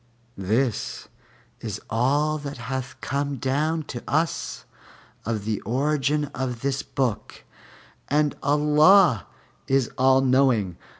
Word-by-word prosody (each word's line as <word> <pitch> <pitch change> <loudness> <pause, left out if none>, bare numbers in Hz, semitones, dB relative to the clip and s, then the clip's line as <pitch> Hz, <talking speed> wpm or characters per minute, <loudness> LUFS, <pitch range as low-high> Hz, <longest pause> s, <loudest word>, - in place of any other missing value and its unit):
This 110 +4 -1 0.5
is - - -5
all 145 +7 +1
that 145 -2 -7
hath 130 +2 -5
come 140 0 -2
down 150 +6 -1
to 125 -4 -7
us 160 +5 -1 0.6
of 110 -3 -2
the 110 -2 -2
origin 145 +4 0
of 125 -3 -4
this 135 0 -1
book, 125 -6 -3 0.6
and 150 0 +1
Allah 150 - +4 0.4
is 135 -3 +1
All 130 0 +5
knowing. 130 -8 +2
135 Hz, 110 wpm, -24 LUFS, 120-150 Hz, 0.6 s, All